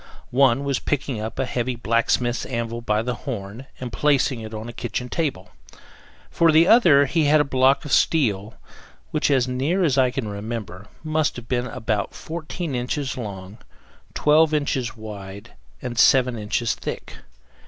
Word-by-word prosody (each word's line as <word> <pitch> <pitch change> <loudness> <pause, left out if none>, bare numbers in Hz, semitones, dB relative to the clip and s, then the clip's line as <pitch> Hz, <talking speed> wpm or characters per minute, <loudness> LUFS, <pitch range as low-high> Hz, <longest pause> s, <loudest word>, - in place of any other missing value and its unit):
One 135 0 +3
was 140 -2 0
picking 140 -5 -2
up 110 +1 -5
a 135 - 0
heavy 125 0 -2
blacksmith's 120 +1 0
anvil 115 -1 -3
by 105 -1 0
the 125 +1 -2
horn 115 0 -7
and 125 -2 -6
placing 140 -4 +1
it 110 0 -8
on 110 +1 -6
a 120 - -7
kitchen 120 +2 -4
table; 130 - -3 0.8
for 165 -1 +4
the 160 +2 +6
other 160 -12 +6
he 155 +3 +1
had 150 +1 +5
a - - +4
block 135 +1 +2
of 145 - -6
steel, 110 -11 +2 0.6
which, - - +1
as 130 -3 +2
near 140 +9 0
as 140 -5 +2
I 130 -1 +4
can 125 -2 -4
remember, 105 -1 -6 0.2
must 155 -2 0
have 120 -2 -9
been 125 0 -1
about 110 -5 -3
14 165 -1 -5
inches 130 +3 -2
long, 100 -3 -7 0.6
12 155 +1 +4
inches 130 -5 -1
wide, 100 -2 -9 0.3
and 120 -1 -3
7 130 -2 +5
inches 110 +2 -1
thick. - - -7
125 Hz, 165 wpm, -23 LUFS, 110-140 Hz, 0.8 s, the